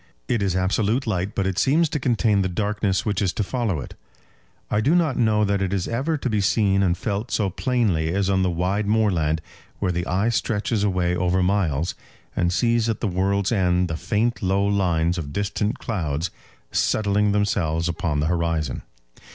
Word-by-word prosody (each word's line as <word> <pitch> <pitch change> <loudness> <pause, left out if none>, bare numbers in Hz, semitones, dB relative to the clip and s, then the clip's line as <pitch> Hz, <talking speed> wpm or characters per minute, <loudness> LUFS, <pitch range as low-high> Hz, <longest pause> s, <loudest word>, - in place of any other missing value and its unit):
It 120 -3 0
is 95 -2 0
absolute 105 +7 +1
light, 95 -3 -2
but 100 - 0
it 95 -2 -1
seems 160 - +3
to 150 - -2
contain 115 -5 +2
the 95 - 0
darkness 100 0 -1
which 105 -2 0
is 95 -3 +1
to 105 - -1
follow 110 - -1
it. - - -8 0.8
I 105 - +2
do 145 +10 +3
not 160 -7 +2
know 110 -3 +2
that 100 -1 0
it 95 -1 -1
is 95 -3 -1
ever 140 +7 -1
to 140 - -3
be 105 -4 +1
seen 100 -1 +2
and 90 -2 +2
felt 105 +2 -3
so 100 -3 0
plainly 100 -10 0
as 100 +1 0
on 95 -1 +2
the 95 - +2
wide 95 +4 -1
moorland, 90 -8 +1 0.4
where 95 -3 0
the 85 0 -2
eye 100 +5 +1
stretches 110 -1 0
away 90 -3 +1
over 90 +1 +1
miles, 90 -5 0 0.4
and 85 -1 +1
sees 115 +3 +1
at 110 - -1
the 115 - -1
world's 95 +1 0
end 90 -4 +2
the 80 - -2
faint 105 +8 -1
low 95 +1 +1
lines 90 -4 +1
of 70 -3 -5
distant 100 +1 -1
clouds 80 -6 -2 0.4
settling 105 -1 +1
themselves 85 -6 0
upon 85 -3 -1
the - - 0
horizon. 85 -4 -1
100 Hz, 190 wpm, -23 LUFS, 90-110 Hz, 0.8 s, seems